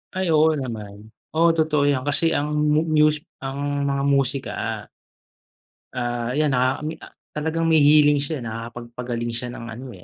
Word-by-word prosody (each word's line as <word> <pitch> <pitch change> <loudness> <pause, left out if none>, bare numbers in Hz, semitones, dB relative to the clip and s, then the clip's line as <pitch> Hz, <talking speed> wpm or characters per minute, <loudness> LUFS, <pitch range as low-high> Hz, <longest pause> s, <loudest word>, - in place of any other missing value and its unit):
Ay 185 -3 0
oo 155 0 +4
naman. 110 -5 -7 0.2
Oo 170 +1 +5
totoo 155 -3 +1
yan 135 -3 +1
kasi 165 +3 +4
ang 150 +1 -1
mu 150 +1 +2
mus 150 -1 +3 0.2
ang 140 +1 -2
mga 140 0 -1
musika. 135 -1 +1 1.4
Ah, 120 0 -2
ayan 150 -1 +2
nakakami 135 +5 -1
ah, - - -14 0.2
talagang 160 +2 -2
may 160 -1 +4
healing 145 0 +5
siya 140 -2 -3
nakakapagpagaling 120 +1 -5
siya 120 +2 -4
ng 115 - -8
ano, 125 +4 -8
eh, 90 - -15
140 Hz, 155 wpm, -22 LUFS, 120-150 Hz, 1.4 s, Oo